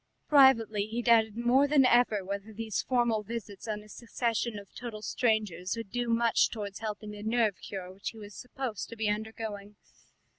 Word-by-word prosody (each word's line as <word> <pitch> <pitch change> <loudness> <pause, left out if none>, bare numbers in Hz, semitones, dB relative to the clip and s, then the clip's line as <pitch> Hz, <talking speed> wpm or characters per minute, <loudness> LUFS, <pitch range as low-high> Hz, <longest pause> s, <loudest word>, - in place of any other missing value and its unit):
Privately 230 -8 +5
he 235 +2 -3
doubted 225 -2 +4
more 250 +4 +4
than 280 -2 +5
ever 240 -6 +3
whether 200 +2 -5
these 220 -1 -3
formal 240 -4 +1
visits 210 -1 -7
on 210 -1 -3
a - - -16
succession 230 0 -2
of 200 -1 -11
total 225 -3 -7
strangers 215 -6 0
would 225 -4 -6
do 245 -1 -2
much 230 0 +3
towards 205 -3 -6
helping 215 -1 -5
the 205 0 -9
nerve 220 -2 +1
cure 185 -2 -7
which 195 - -5
he 225 - -12
was 205 -1 -10
supposed 250 -4 -5
to 230 - -8
be 220 -1 -1
undergoing. 210 -1 -4
220 Hz, 180 wpm, -30 LUFS, 205-235 Hz, -, Privately